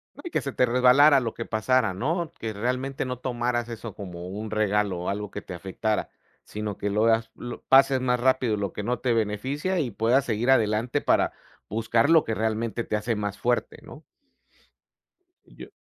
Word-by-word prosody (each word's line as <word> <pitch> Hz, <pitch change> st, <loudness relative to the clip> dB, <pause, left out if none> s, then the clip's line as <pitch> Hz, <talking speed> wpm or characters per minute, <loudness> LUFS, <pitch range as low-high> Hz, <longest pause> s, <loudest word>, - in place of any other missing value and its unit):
No, -, -, -12 dB
y -, -, -4 dB
que -, -, -1 dB
se 140 Hz, -, -4 dB
te 125 Hz, -, +3 dB
resbalara 130 Hz, +4 st, +6 dB
lo 115 Hz, -3 st, -3 dB
que 115 Hz, -, -6 dB
pasara, 110 Hz, -1 st, +1 dB
¿no? 165 Hz, -, -2 dB
Que 110 Hz, -1 st, -4 dB
realmente 125 Hz, +5 st, -2 dB
no 125 Hz, -1 st, -4 dB
tomaras 120 Hz, -1 st, -2 dB
eso 115 Hz, -2 st, -7 dB
como 90 Hz, -3 st, -8 dB
un 105 Hz, +4 st, -6 dB
regalo 105 Hz, -3 st, 0 dB
o 90 Hz, -, -3 dB
algo 105 Hz, 0 st, -4 dB
que 105 Hz, -, -6 dB
te 90 Hz, -, -8 dB
afectara, 100 Hz, +4 st, -2 dB, 0.3 s
sino 105 Hz, -, -5 dB
que 105 Hz, -, -2 dB
lo 105 Hz, +2 st, +2 dB
hagas 115 Hz, 0 st, +2 dB
lo 120 Hz, 0 st, -8 dB
pases 135 Hz, 0 st, +5 dB
más 125 Hz, -1 st, +1 dB
rápido 130 Hz, -3 st, +2 dB
lo 100 Hz, -3 st, -3 dB
que 105 Hz, -, -5 dB
no 120 Hz, +2 st, -1 dB
te 125 Hz, -2 st, +1 dB
beneficia 130 Hz, -, -1 dB
y 140 Hz, -6 st, -1 dB
puedas 120 Hz, +5 st, +2 dB
seguir 120 Hz, +2 st, +1 dB
adelante 115 Hz, +3 st, +2 dB
para -, -, +2 dB, 0.3 s
buscar 115 Hz, +6 st, +1 dB
lo 160 Hz, -2 st, +6 dB
que 110 Hz, -, -2 dB
realmente 110 Hz, +1 st, -1 dB
te 105 Hz, -, -2 dB
hace 110 Hz, +2 st, -1 dB
más 105 Hz, -1 st, -4 dB
fuerte, 120 Hz, 0 st, -1 dB
¿no? -, -, -13 dB, 1.4 s
Yo -, -, -12 dB
115 Hz, 195 wpm, -25 LUFS, 105-130 Hz, 1.4 s, resbalara